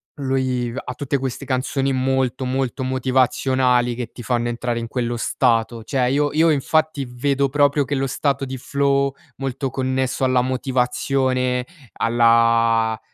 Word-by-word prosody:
lui 130 -3 -1
v 120 - -8
ha 125 - -5
tutte 140 +1 -2
queste 135 +1 -4
canzoni 135 +1 -1
molto 130 0 0
molto 130 0 -2
motivazionali 130 -1 +1
che 120 -1 -5
ti - - -10
fanno 120 0 -1
entrare 120 0 -2
in 115 - -5
quello 120 -1 -2
stato. 115 -2 0
Cioè 125 +1 0
io 145 +1 +1
io 160 +2 +4
infatti 155 0 0
vedo 135 +3 0
proprio 145 0 +2
che 145 - -2
lo 135 0 0
stato 140 +1 -1
di 130 0 -5
flow 140 +1 0 0.2
molto 135 0 -3
connesso 130 0 -1
alla 130 -1 +3
motivazione 130 0 0 0.3
alla 115 -1 +3
130 Hz, 145 wpm, -21 LUFS, 125-135 Hz, 0.3 s, io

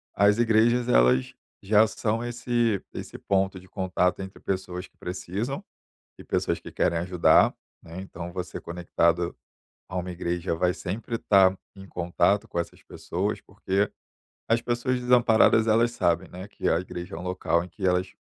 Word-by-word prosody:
as 100 +2 +4
igrejas 120 +1 +3
elas 65 - +4 0.3
já 105 +2 +5
são 110 +2 -2
esse 120 -3 0
esse - - -7
ponto 95 -1 0
de 95 - -17
contato 90 -1 0
entre 95 0 -8
pessoas 90 -1 -4
que - - -40
precisam 105 - -4 0.5
e - - -11
pessoas - - -1
que - - -11
querem 85 -2 +1
ajudar, 90 0 +4 0.3
né, 85 +3 -8
então 90 -2 -8
você 90 -1 -5
conectado 85 0 0 0.6
a 90 - -4
uma 90 0 -3
igreja 85 0 -2
vai 90 +1 +1
sempre 110 +7 -4
estar 95 -4 +4 0.2
em 95 0 -11
contato 90 +3 +1
com - - -7
essas 85 - -4
pessoas, - - -3
porque 100 +2 -1 0.6
as 115 +1 +3
pessoas 120 +2 -1
desamparadas 120 -2 +4
elas 115 +2 +3
sabem, 85 -3 0
né, 95 +4 -9
que - - -3
a 80 - +3
igreja 90 -2 -7
é 80 - -5
um - - -8
local 90 -2 0
em 90 - -10
que 95 +2 -4
elas 90 +1 +1
95 Hz, 165 wpm, -26 LUFS, 90-110 Hz, 0.6 s, já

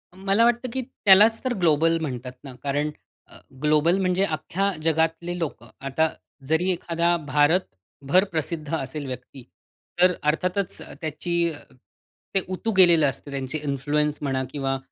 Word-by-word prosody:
मला 195 +4 +2
वाटतं 240 +1 +1
की 260 - -1
त्यालाच 220 -2 +5
तर 255 -1 0
ग्लोबल 165 0 +3
म्हणतात 125 -4 -4
ना 135 -2 -9
कारण 145 +2 0 0.4
अ, - - -15 0.3
ग्लोबल 155 +4 +3
म्हणजे 185 0 +1
अख्ख्या 195 +4 -1
जगातले 165 +2 0
लोकं. 140 -8 -5
आता 135 +4 0 0.4
जरी 160 +5 +1
एखादा 170 0 0
भारतभर 145 - +1
प्रसिद्ध 160 -1 -3
असेल 145 0 -4
व्यक्ती, 125 0 -8 0.6
तर 180 0 +6 0.2
अर्थातच 180 +4 -2 0.2
त्याची 160 +2 -3 1.0
ते - - +5
उतू 225 +5 -2
गेलेलं 170 -4 +6
असतं, 140 +2 -7
त्यांची 135 +1 -3
इन्फ्लुअन्स 145 +1 0
म्हणा 135 -2 -1
किंवा 135 -2 -1
160 Hz, 135 wpm, -24 LUFS, 140-180 Hz, 1.0 s, तर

